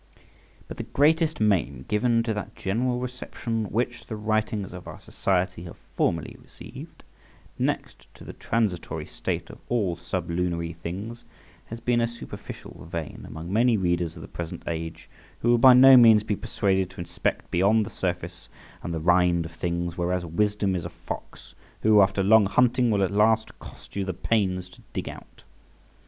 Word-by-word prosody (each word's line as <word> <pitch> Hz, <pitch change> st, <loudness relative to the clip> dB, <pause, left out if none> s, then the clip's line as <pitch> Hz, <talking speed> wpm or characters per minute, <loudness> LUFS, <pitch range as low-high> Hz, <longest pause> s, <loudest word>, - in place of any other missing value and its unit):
But -, -, -8 dB
the -, -, -3 dB, 0.2 s
greatest 160 Hz, +2 st, +3 dB
maim 85 Hz, -, +1 dB
given 115 Hz, +2 st, +2 dB
to 115 Hz, -1 st, -1 dB
that 105 Hz, -2 st, -6 dB
general 120 Hz, +5 st, -1 dB
reception 125 Hz, -3 st, -4 dB
which 120 Hz, +3 st, -2 dB
the 110 Hz, -, -4 dB
writings 110 Hz, -2 st, -1 dB
of 90 Hz, -1 st, -9 dB
our -, -, -8 dB
society 90 Hz, -2 st, -1 dB
have 85 Hz, -, -10 dB, 0.2 s
formerly 85 Hz, -2 st, 0 dB
received, -, -, -12 dB, 0.6 s
next -, -, -2 dB
to -, -, -13 dB
the -, -, -8 dB
transitory 105 Hz, -7 st, -2 dB
state -, -, -4 dB
of -, -, -13 dB
all 105 Hz, -8 st, +1 dB
sublunary 85 Hz, -1 st, -2 dB
things, 100 Hz, +8 st, -6 dB, 0.4 s
has 115 Hz, -, -7 dB
been 120 Hz, 0 st, +1 dB
a 115 Hz, -, +2 dB
superficial 115 Hz, -6 st, -10 dB
vein 80 Hz, -3 st, -5 dB
among 85 Hz, +4 st, -7 dB
many 115 Hz, +1 st, +4 dB
readers 85 Hz, -3 st, 0 dB
of 80 Hz, -, -9 dB
the -, -, -9 dB
present 85 Hz, -1 st, -6 dB
age, 80 Hz, -1 st, -5 dB, 0.3 s
who 120 Hz, -, +1 dB
will 120 Hz, -, +4 dB
by 130 Hz, +1 st, +9 dB
no 130 Hz, +1 st, +9 dB
means 115 Hz, -4 st, +7 dB
be 105 Hz, -1 st, -1 dB
persuaded 95 Hz, -2 st, 0 dB
to 95 Hz, -, -14 dB
inspect 85 Hz, -, -3 dB
beyond 105 Hz, +5 st, +3 dB
the -, -, -8 dB
surface 85 Hz, -1 st, -4 dB, 0.3 s
and 85 Hz, -, -4 dB
the -, -, -2 dB
rind 90 Hz, 0 st, +3 dB
of 80 Hz, -, -8 dB
things; 85 Hz, 0 st, -3 dB
whereas 90 Hz, 0 st, 0 dB
wisdom 100 Hz, +3 st, 0 dB
is 85 Hz, -, -2 dB
a -, -, -5 dB
fox, -, -, -9 dB, 0.3 s
who, 105 Hz, -1 st, +6 dB
after 95 Hz, 0 st, +2 dB
long 105 Hz, +1 st, +6 dB
hunting, 125 Hz, +4 st, +3 dB
will 100 Hz, -3 st, +2 dB
at 95 Hz, -, 0 dB
last 110 Hz, +2 st, +2 dB
cost -, -, -13 dB
you 100 Hz, -, -1 dB
the 95 Hz, -2 st, -4 dB
pains 95 Hz, -2 st, 0 dB
to 90 Hz, -, -17 dB
dig -, -, -3 dB
out. -, -, -11 dB
100 Hz, 175 wpm, -26 LUFS, 85-115 Hz, 0.6 s, by